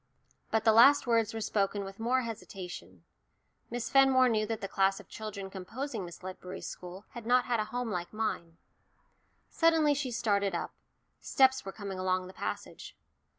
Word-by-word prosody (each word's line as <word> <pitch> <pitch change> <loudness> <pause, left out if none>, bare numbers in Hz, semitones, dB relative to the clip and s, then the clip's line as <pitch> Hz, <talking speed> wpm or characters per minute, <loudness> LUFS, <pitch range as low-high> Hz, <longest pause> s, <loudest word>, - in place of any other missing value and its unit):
But 220 0 +1
the 220 -1 +5
last 275 +6 +7
words 230 -2 +2
were 225 - -5
spoken 200 -1 0
with 195 +1 -9
more 250 +3 +2
hesitation. 180 - -8 0.7
Miss 240 -1 -3
Fenmore 265 -2 +5
knew 215 -2 +1
that 225 -1 -3
the 195 - -4
class 195 0 +1
of - - -13
children 200 -3 -7
composing 220 +3 -5
Miss 175 +1 -11
Ledbury's 185 0 -7
school 180 +3 -8
had 235 -2 -9
not 250 +1 +4
had 240 -2 0
a 215 - 0
home 245 0 -3
like 175 -2 -3
mine. 170 -7 -3 0.9
Suddenly 325 -3 +4
she 280 -2 -2
started 205 -5 0
up - - -4 0.5
steps 265 0 +3
were 195 - -5
coming 195 -2 -6
along 185 0 0
the 185 - -11
passage. - - -6
215 Hz, 170 wpm, -31 LUFS, 190-245 Hz, 0.9 s, last